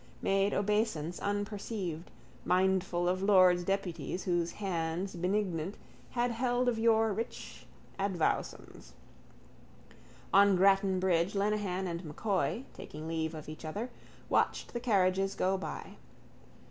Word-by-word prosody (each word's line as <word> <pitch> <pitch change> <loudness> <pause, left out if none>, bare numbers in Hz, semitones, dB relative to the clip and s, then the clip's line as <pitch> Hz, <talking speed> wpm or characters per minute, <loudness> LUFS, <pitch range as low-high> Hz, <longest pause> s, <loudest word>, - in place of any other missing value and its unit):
made 195 +1 +2
obeisance 205 -6 0
unperceived, 205 -4 -3 0.3
mindful 185 -1 +2
of 185 +1 +1
lords 185 -3 +5
deputies 190 -1 -2
whose 175 -2 0
hands 180 -1 -2
benignant 180 -1 -1 0.3
had 245 0 0
held 245 +1 0
of 235 -2 +1
yore 225 -1 +3
rich 225 +4 -6 0.3
advowsons. 180 - -2 1.4
On 200 0 +6
Grattan 195 0 +4
bridge 180 0 +1
Lenehan 200 -2 0
and 170 0 -4
M'Coy, 195 - -1
taking 155 +1 -8
leave 160 0 -2
of 155 - -8
each 155 0 -8
other, 210 +11 -4 0.4
watched - - 0
the 240 - -2
carriages 195 -4 +2
go 190 +1 +1
by. 190 - -6
190 Hz, 115 wpm, -32 LUFS, 175-205 Hz, 1.4 s, On